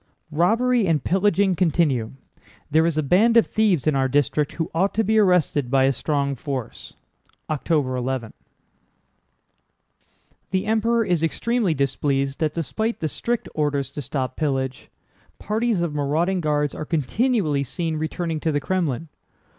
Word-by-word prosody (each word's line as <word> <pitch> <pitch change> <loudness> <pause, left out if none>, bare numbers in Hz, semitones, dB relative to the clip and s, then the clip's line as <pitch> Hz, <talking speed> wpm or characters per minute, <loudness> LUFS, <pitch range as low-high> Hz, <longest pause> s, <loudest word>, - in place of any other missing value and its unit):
"Robbery 225 +8 +2
and 155 -5 +1
pillaging 195 +1 +2
continue. 155 -10 +1 0.6
There 160 +2 +4
is 165 -2 -1
a 155 - +1
band 215 - +4
of 230 - +6
thieves 210 - +1
in 155 -2 +2
our 135 -1 +2
district 145 +2 +1
who 165 -1 -3
ought 190 +5 +1
to 225 - +2
be 220 +1 +3
arrested 180 - +2
by 135 0 +3
a 135 - +4
strong 140 +1 -1
force—October 140 +2 -4
11." 125 -2 -3 2.2
"The 190 +1 -1
Emperor 225 +1 +1
is 175 -4 +1
extremely 210 +2 0
displeased 135 0 -1
that 155 -2 -1
despite 220 - -2
the 160 - -1
strict 240 - -3
orders 145 -3 -1
to 145 - -5
stop 135 -1 -3
pillage, 135 -4 -2 0.5
parties 215 -3 0
of 165 -3 -2
marauding 160 +6 0
Guards 150 -2 0
are - - -5
continually 165 - 0
seen 160 +4 -3
returning 160 +1 -3
to 160 - -1
the 145 - +1
Krémlin. 165 -4 -2
155 Hz, 145 wpm, -23 LUFS, 140-190 Hz, 2.2 s, of